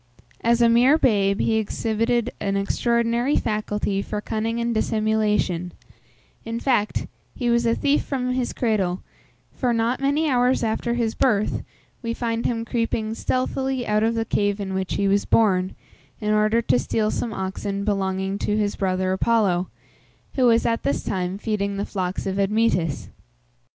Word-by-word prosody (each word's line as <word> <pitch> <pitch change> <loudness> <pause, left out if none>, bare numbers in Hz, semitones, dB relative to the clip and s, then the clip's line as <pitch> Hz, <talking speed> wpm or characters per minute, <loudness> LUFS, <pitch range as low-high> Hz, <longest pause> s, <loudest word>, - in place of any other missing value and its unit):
As 235 +1 +3
a - - +6
mere 245 +6 +5
babe, 200 -8 +2
he 225 - +2
exhibited 230 +2 0
an 200 -1 -1
extraordinary 235 +5 +1
faculty 210 -2 -1
for 210 - -4
cunning 225 +2 -2
and 235 0 0
dissimulation; 215 -5 0 0.7
in 230 +1 -4
fact, 240 -5 0 0.3
he 240 -2 0
was 235 0 +2
a 230 - +3
thief 285 +1 +2
from 255 -2 -2
his 250 -1 -1
cradle, 195 -6 -1 0.5
for, 245 -3 0
not 230 +2 0
many 285 +3 +1
hours 250 -2 +2
after 230 +2 -1
his 230 -2 0
birth, 215 -5 +1 0.4
we 230 -1 -3
find 230 -1 -1
him 230 -1 -2
creeping 230 -2 -1
stealthily 260 +1 -1
out 210 0 +1
of 225 +1 +1
the 225 0 0
cave 205 -1 0
in 195 -1 -4
which 190 -1 -2
he 200 - +1
was 200 +1 +2
born, 190 -4 +2 0.4
in 210 -1 0
order 215 +2 +2
to 125 - +2
steal 215 - 0
some 235 - -2
oxen 195 0 -3
belonging 195 -1 -1
to 210 - 0
his 205 -1 0
brother 185 -1 0
Apollo, 190 -3 +2 0.7
who 260 - +2
was 230 -1 +4
at 230 0 +1
this 140 - -1
time 185 0 -2
feeding 200 -2 -2
the 200 - -2
flocks 185 -2 -3
of 195 0 -2
Admetus. 195 -6 +1
220 Hz, 160 wpm, -23 LUFS, 200-235 Hz, 0.7 s, a